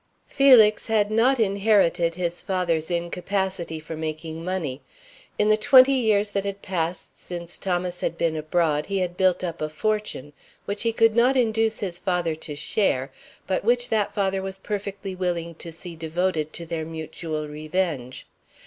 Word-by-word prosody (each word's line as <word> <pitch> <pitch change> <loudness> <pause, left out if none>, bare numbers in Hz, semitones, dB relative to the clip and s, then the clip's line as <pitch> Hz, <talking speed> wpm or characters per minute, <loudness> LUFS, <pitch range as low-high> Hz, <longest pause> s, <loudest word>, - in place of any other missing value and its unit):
Felix 245 -7 +5
had 215 -2 +2
not 240 +4 +3
inherited 195 -5 +2
his 175 -1 -3
father's 170 -4 -1
incapacity 175 0 -2
for 160 +1 -7
making 160 +1 -5
money. 165 -7 -3 0.6
In 210 - +2
the 215 - +5
twenty 260 +4 +7
years 215 -5 +2
that 200 -1 -1
had 200 0 -5
passed 175 -2 -3
since 175 -1 -7
Thomas 180 -1 -2
had 170 - -2
been 165 -1 0
abroad 155 -1 0
he 200 0 -1
had 180 -2 -1
built 185 -1 +2
up 170 -3 -4
a 155 - -1
fortune, 210 -4 -2 0.3
which 200 +1 -3
he 230 - +2
could 225 -1 +3
not 250 +3 +4
induce 225 -2 +1
his 180 -4 -3
father 180 -4 0
to 155 -1 -7
share, 145 -4 0 0.3
but 190 - -1
which 240 +2 +2
that 215 -2 +1
father 195 -1 0
was 190 0 -5
perfectly 200 -1 -5
willing 175 -2 -2
to 165 +1 -9
see 170 +1 -8
devoted 160 -1 -1
to 170 - -5
their 165 -1 -3
mutual 160 -1 -5
revenge. 150 -4 -3
180 Hz, 165 wpm, -24 LUFS, 165-205 Hz, 0.6 s, twenty